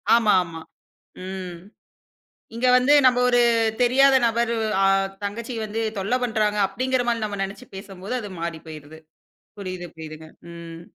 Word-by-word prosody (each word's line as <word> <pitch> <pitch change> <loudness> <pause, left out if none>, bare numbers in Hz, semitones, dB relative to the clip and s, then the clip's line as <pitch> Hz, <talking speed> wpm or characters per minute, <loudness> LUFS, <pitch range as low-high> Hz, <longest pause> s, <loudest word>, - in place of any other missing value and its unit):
ஆமா 220 -3 +3
ஆமா. 165 -2 -9 0.7
ம். 185 -2 -6 1.0
இங்க 250 +2 0
வந்து 255 +3 +4
நம்ப 250 -1 +5
ஒரு 245 0 +4 0.4
தெரியாத 270 +3 +5
நபர் 235 0 +1 0.3
அ - - +5 0.4
தங்கச்சி 230 +5 -5
வந்து 215 +2 -4 0.2
தொல்லை 200 +6 0
பண்றாங்க 215 -3 0
அப்படிங்கிற 255 +5 -1
மாரி 230 -2 0
நம்ம 205 -1 -5
நெனச்சு 200 +6 -8
பேசும்போது, 195 +2 -8
அது 205 - -7
மாறி 170 -1 -4
போயிருது. 155 0 -11 0.6
புரியுது 185 -2 -6
புரியுதுங்க 160 0 -10 0.3
ம். 165 -1 -10
205 Hz, 135 wpm, -23 LUFS, 175-240 Hz, 1.0 s, நம்ப